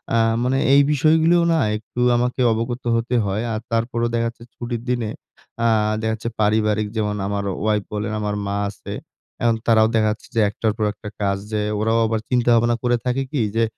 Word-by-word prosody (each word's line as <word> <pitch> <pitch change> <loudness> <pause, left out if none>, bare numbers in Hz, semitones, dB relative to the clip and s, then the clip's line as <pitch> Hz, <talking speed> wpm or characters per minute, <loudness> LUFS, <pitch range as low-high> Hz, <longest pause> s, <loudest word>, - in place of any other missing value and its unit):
আ - - +4 0.3
মানে 130 +2 +1 0.2
এই 140 - +7
বিষয়গুলোও 160 +4 +4
না - - +2 0.2
একটু 110 +3 -9 0.2
আমাকে 125 +1 -1
অবগত 120 +3 -3
হতে 120 +2 -1
হয়। 100 +4 -1
আর 110 - -2
তারপরও 115 +1 0
দেখাচ্ছে 115 0 -2
ছুটির 120 -1 -4
দিনে 120 -3 0 0.6
আ - - +5 0.3
দেখাচ্ছে 110 +1 -2
পারিবারিক 105 0 +2
যেমন 105 -1 0
আমার 100 0 -2 0.2
ওয়াইফ 105 -2 +1
বলেন, 105 +1 -2
আমার 105 0 -2
মা 100 - -2
আছে। 100 - -8 0.5
এখন 115 -1 +3
তারাও 110 -1 +5
দেখাচ্ছে 110 0 0
যে - - +2
একটার 110 +1 -1
পর 110 - 0
একটা 105 0 -9
কাজ, 100 -1 +1
যে 105 -1 0 0.2
ওরাও 115 +1 +2
আবার 110 0 0
চিন্তাভাবনা 120 -1 +3
করে 120 0 +2
থাকে 130 +2 0
কি? 140 -6 0
যে 115 - +3
115 Hz, 180 wpm, -21 LUFS, 105-120 Hz, 0.6 s, এই